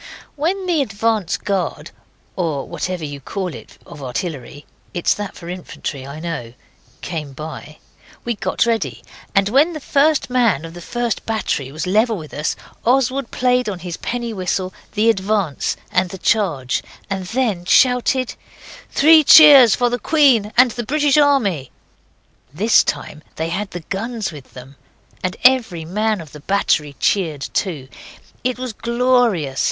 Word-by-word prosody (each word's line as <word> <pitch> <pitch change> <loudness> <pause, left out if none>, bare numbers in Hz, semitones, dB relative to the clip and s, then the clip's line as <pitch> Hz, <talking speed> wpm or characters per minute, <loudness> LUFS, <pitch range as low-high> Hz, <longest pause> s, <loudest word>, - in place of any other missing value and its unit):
When 360 +6 -1
the 340 -5 +1
advance 215 -5 -1
guard 195 -3 -3 0.4
(or 160 -7 -2
whatever 180 -3 -4
you 145 -1 -7
call 185 +3 -4
it 110 -2 -12
of 145 - -11
artillery 145 +1 -5 0.3
it's 175 - +2
that 205 -1 -6
for 170 - -11
infantry, 165 -6 -6
I 140 +2 -8
know) 155 -9 -5 0.5
came 155 -5 -5
by, 155 +1 -8 0.5
we 235 - 0
got 220 - 0
ready, 230 -1 -2 0.3
and 195 0 +4
when 290 +9 +3
the 310 - -5
first 290 +2 +2
man 235 - +1
of 165 - -9
the 175 - -10
first 240 +4 -2
battery 165 -11 -2
was 155 +3 -4
level 215 +4 +2
with 155 -3 -10
us 150 +1 -2 0.3
Oswald 260 +1 +1
played 250 -2 +1
on 195 - -4
his 175 -1 -6
penny 240 -1 -4
whistle 185 -1 -2 0.2
the 215 +2 +1
'advance' 200 -7 0
and 185 0 +1
the 190 - -7
'charge' 170 - 0 0.3
and 195 -2 -4
then 225 -6 -1
shouted 250 +3 +3 0.6
'Three 315 +2 +6
cheers 285 -7 +9
for 245 -1 +1
the 245 - -1
Queen 255 -7 +3
and 250 0 +6
the 240 +1 -4
British 290 +3 +1
Army!' 230 - +2 0.8
This 210 +10 +4
time 150 - -4
they 160 +1 -3
had 195 +4 -3
the 175 - -7
guns 220 +1 -3
with 145 -4 -13
them. 130 +2 -12 0.5
And 185 0 -2
every 235 -11 +3
man 210 +3 -1
of 155 - -12
the 150 - -11
battery 150 -4 0
cheered 160 -8 0
too. 155 -9 -2 0.6
It 250 0 -1
was 255 -2 -5
glorious. 235 - +1
200 Hz, 155 wpm, -19 LUFS, 165-245 Hz, 0.8 s, cheers